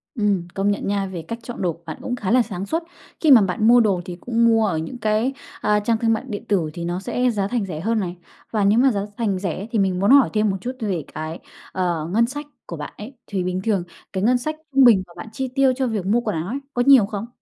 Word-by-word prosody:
Ừm, 200 -6 0
công 195 +1 +1
nhận 205 - -2
nha, 200 -1 0
về 180 -3 -6
cách 230 - -4
chọn 235 -1 -7
đồ 175 -2 +1
của 170 - -20
bạn 160 - -6
cũng 245 - -3
khá 200 -6 -3
là 250 +1 +5
sáng 200 -4 -5
suốt. 325 +10 -1 0.4
Khi 315 - +3
mà 255 -4 +9
bạn 200 +3 +1
mua 245 +1 +7
đồ 200 -5 +2
thì 175 -1 -7
cũng 230 +5 0
mua 225 -1 +4
ở 170 -6 -1
những 160 +10 -5
cái, 220 +3 +1 0.3
a, 210 0 +2
trang 225 +2 +1
thương 225 0 +2
mại 225 - -1
điện 205 -4 -5
tử 180 -7 +1
thì 170 - -5
nó 175 +2 -2
sẽ 250 +5 0
giá 200 -4 -1
thành 235 -1 -1
rẻ 160 -5 -5
hơn 225 +4 0
này. 180 -2 -4 0.3
Và 215 -3 +1
nếu 205 +3 +4
mà 265 +2 +5
giá 205 -4 -1 0.2
thành 205 -5 0
rẻ 185 -3 -3
ấy 200 +4 -6
thì 225 - 0
mình 190 -2 +1
muốn 200 - +3
hỏi 275 -2 +6
thêm 215 -1 +2
một 190 - -1
chút 250 +6 -4
về 190 -8 -2
cái, 155 +2 -5 0.3
ờ, 175 -4 -1
ngân 230 +3 +3
sách 290 +4 -6 0.2
của 170 - -6
bạn 150 -1 -7
ấy. 225 +6 -9
Thì 190 -3 -2
bình 185 0 -2
thường 205 -5 +1 0.3
cái 190 - -2
ngân 245 +4 +3
sách 310 +5 -4 0.2
trung 270 0 +6
bình 220 -6 +6
mà 175 - -17
bạn 175 - -8
chi 265 +2 -3
tiêu 270 -1 +4
cho 265 -1 0
việc 215 -6 -2
mua 220 +5 +3
quần 235 - -2
áo 160 +2 -3
ấy, 255 +6 -2 0.2
có 245 - +2
nhiều 265 -7 +7
không? 205 +1 -5
210 Hz, 285 wpm, -22 LUFS, 185-235 Hz, 0.4 s, mà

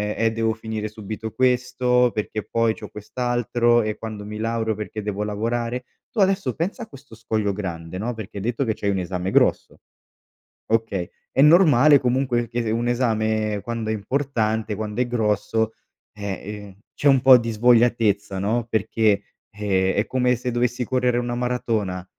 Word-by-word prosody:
"Eh, 115 0 +1
devo 115 0 0
finire 110 -1 -5
subito 110 +1 -6
questo, 125 0 +2
perché 110 0 -3
poi 115 -1 +2
c'ho 105 - -9
quest'altro 120 +2 0
e 105 0 -3
quando 110 -2 -7
mi 105 +1 -6
laureo 110 0 -1
perché 105 0 -6
devo 105 0 -2
lavorare." 115 +4 -2 0.3
Tu 230 - -5
adesso 190 - +2
pensa 180 +7 -3
a - - -10
questo 135 - -15
scoglio 110 -2 -1
grande 85 -3 -5
no, 120 +4 -2
perché 110 -2 -7
detto 120 +6 -1
che 110 - 0
c'hai 100 - -2
un 100 - -1
esame 90 0 -3
grosso. - - +1 0.9
Okay, 110 -5 -1 0.2
è 135 - +2
normale 150 -3 +6
comunque 125 -1 0
che 120 +1 -2
se 110 - -2
un 115 +2 0
esame 110 -3 0
quando 115 -2 -3
è - - +1
importante, 110 -1 -1
quando 105 +2 -4
è - - -1
grosso, 110 -1 0 0.5
eh, 100 -1 -3 0.4
ehm, 95 - -16 0.2
c'è - - -4
un 135 -2 +5
po' 130 0 +8
di 115 -1 -3
svogliatezza 115 -3 +2
no, 110 +4 0
perché, 110 -1 +1 0.3
ehm, 95 -2 +1
è 105 - +1
come 125 -1 +1
se 125 +1 -3
dovessi 120 +1 0
correre 125 -1 +1
una 120 0 -2
maratona 115 -7 -2
115 Hz, 170 wpm, -23 LUFS, 105-125 Hz, 0.9 s, po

